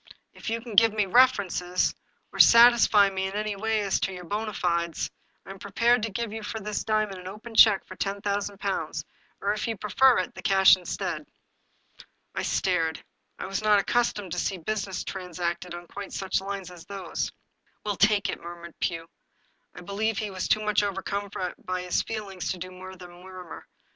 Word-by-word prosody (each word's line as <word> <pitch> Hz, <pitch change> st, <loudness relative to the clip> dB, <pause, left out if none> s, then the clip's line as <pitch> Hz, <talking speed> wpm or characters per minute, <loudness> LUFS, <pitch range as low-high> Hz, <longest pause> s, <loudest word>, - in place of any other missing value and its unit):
" -, -, -44 dB
If -, -, -6 dB
you 230 Hz, +1 st, -2 dB
can 235 Hz, -1 st, -9 dB
give 225 Hz, +1 st, +6 dB
me 210 Hz, -2 st, +1 dB
references, 195 Hz, -6 st, +3 dB, 0.4 s
or -, -, -8 dB
satisfy 230 Hz, -4 st, +7 dB
me 190 Hz, 0 st, -2 dB
in 190 Hz, -, -6 dB
any 210 Hz, 0 st, -2 dB
way 220 Hz, +1 st, 0 dB
as 200 Hz, -2 st, 0 dB
to 195 Hz, -, -1 dB
your 180 Hz, -1 st, -8 dB
bona 210 Hz, +4 st, -3 dB
fides, 170 Hz, -3 st, -1 dB, 0.3 s
I 190 Hz, -, -9 dB
am 195 Hz, -, -10 dB
prepared 230 Hz, +4 st, +2 dB
to 225 Hz, -, -2 dB
give 225 Hz, +1 st, -3 dB
you 225 Hz, -, -5 dB
for 220 Hz, +1 st, -5 dB
this 210 Hz, 0 st, -3 dB
diamond 215 Hz, -3 st, 0 dB
an 180 Hz, -, -9 dB
open 215 Hz, +4 st, -9 dB
check 215 Hz, -3 st, +6 dB
for 185 Hz, -, -10 dB
ten 200 Hz, +1 st, -2 dB
thousand 200 Hz, 0 st, -2 dB
pounds, 195 Hz, -1 st, -3 dB, 0.4 s
or 200 Hz, +1 st, +1 dB
if 215 Hz, +3 st, -3 dB
you 225 Hz, -2 st, -2 dB
prefer 245 Hz, +6 st, +4 dB
it, 185 Hz, -, -2 dB
the -, -, -9 dB
cash 190 Hz, -1 st, +6 dB
instead." 180 Hz, -2 st, -4 dB, 1.1 s
I -, -, -2 dB
stared; 165 Hz, -4 st, 0 dB, 0.3 s
I -, -, -5 dB
was 195 Hz, +1 st, -3 dB
not 210 Hz, -1 st, +5 dB
accustomed 205 Hz, -3 st, 0 dB
to 180 Hz, -, -2 dB
see 190 Hz, -, -1 dB
business 195 Hz, +1 st, -3 dB
trans 180 Hz, -2 st, -7 dB
acted 175 Hz, 0 st, -2 dB
on 175 Hz, 0 st, -9 dB
quite 200 Hz, +3 st, -8 dB
such 190 Hz, 0 st, -1 dB
lines 195 Hz, -2 st, -5 dB
as 175 Hz, -2 st, -12 dB
those. 195 Hz, -4 st, -4 dB, 0.5 s
"We'll 205 Hz, -1 st, -1 dB
take 205 Hz, 0 st, +3 dB
it," -, -, -4 dB
murmured 170 Hz, -1 st, -9 dB
Pugh; 165 Hz, -1 st, -2 dB, 0.7 s
I -, -, -9 dB
believe 205 Hz, +4 st, -1 dB
he 215 Hz, -2 st, -2 dB
was 185 Hz, -1 st, -3 dB
too 215 Hz, -, +2 dB
much 210 Hz, -1 st, +2 dB
overcome 200 Hz, 0 st, -3 dB, 0.3 s
by 185 Hz, 0 st, -3 dB
his 180 Hz, -, +1 dB
feeUngs 200 Hz, -5 st, -5 dB
to 185 Hz, -, -2 dB
do 185 Hz, +1 st, -7 dB
more 185 Hz, +1 st, -10 dB
than 180 Hz, -1 st, -12 dB
mur 185 Hz, +1 st, -11 dB
mur. 170 Hz, -, -11 dB
195 Hz, 200 wpm, -27 LUFS, 185-215 Hz, 1.1 s, satisfy